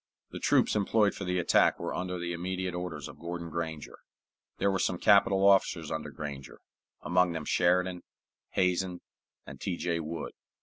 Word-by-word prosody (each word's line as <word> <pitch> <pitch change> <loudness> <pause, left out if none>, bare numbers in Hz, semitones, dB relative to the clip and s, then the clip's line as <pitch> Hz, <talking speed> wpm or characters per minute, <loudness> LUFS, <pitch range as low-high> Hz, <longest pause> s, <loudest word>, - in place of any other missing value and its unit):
The - - -6
troops - - +3
employed 105 0 +2
for 95 - -6
the 90 0 0
attack 90 - +3
were - - -3
under 90 0 -3
the 85 0 -3
immediate 90 +1 -3
orders 90 -1 -5
of - - -12
Gordon 85 0 -6
Granger. 80 -2 -5 0.6
There 100 - +2
were 95 - 0
some 90 - 0
capital 100 0 +5
officers 95 -5 +3
under 80 -1 -3
Granger, 70 -2 -8 0.4
among 90 0 +2
them 80 -2 -4
Sheridan, 90 +1 +2 0.5
Hazen, 90 -1 0 0.4
and - - -11
T. 90 -3 -2
J. 85 -1 -1
Wood. 80 0 -5
90 Hz, 165 wpm, -29 LUFS, 85-95 Hz, 0.6 s, capital